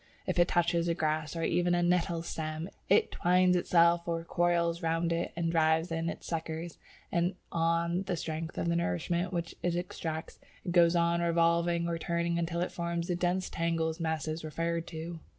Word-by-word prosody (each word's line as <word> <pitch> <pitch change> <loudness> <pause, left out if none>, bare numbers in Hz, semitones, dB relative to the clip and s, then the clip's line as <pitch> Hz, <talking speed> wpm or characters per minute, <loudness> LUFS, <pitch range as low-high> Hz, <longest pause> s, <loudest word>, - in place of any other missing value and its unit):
If - - -1
it 175 - +5
touches 170 0 +1
a 170 - +1
grass 155 0 -1
or 165 - -2
even 175 +1 +2
a 175 - +1
nettle 175 -1 +1
stem, 155 +1 -4 0.2
it 200 - +4
twines 180 +1 +3
itself 170 -1 +3
or 165 -1 -1
coils 170 0 +1
round 165 +1 0
it, 170 +1 -2 0.2
drives 160 +1 +2
in 165 0 -1
its - - -7
suckers, 165 0 -4 0.3
and, 175 +2 +1 0.2
on 170 +1 +1
the 180 -3 -1
strength 160 +1 -4
of - - -1
the 170 - +1
nourishment 170 - -1
which 170 -2 -3
it 175 -1 0
extracts, 165 -2 -4 0.3
it 175 - -2
goes 170 -1 +5
on 170 0 +2
revolving 170 0 +2
or 170 -1 -2
turning 170 0 -1
until 170 0 -1
it 180 - -1
forms 170 0 -3
the 175 - +1
dense 180 +1 0
tangled 165 -1 -1
masses 160 -1 -2
referred 165 +2 -2
to. 165 +1 -6
170 Hz, 180 wpm, -30 LUFS, 165-175 Hz, 0.3 s, it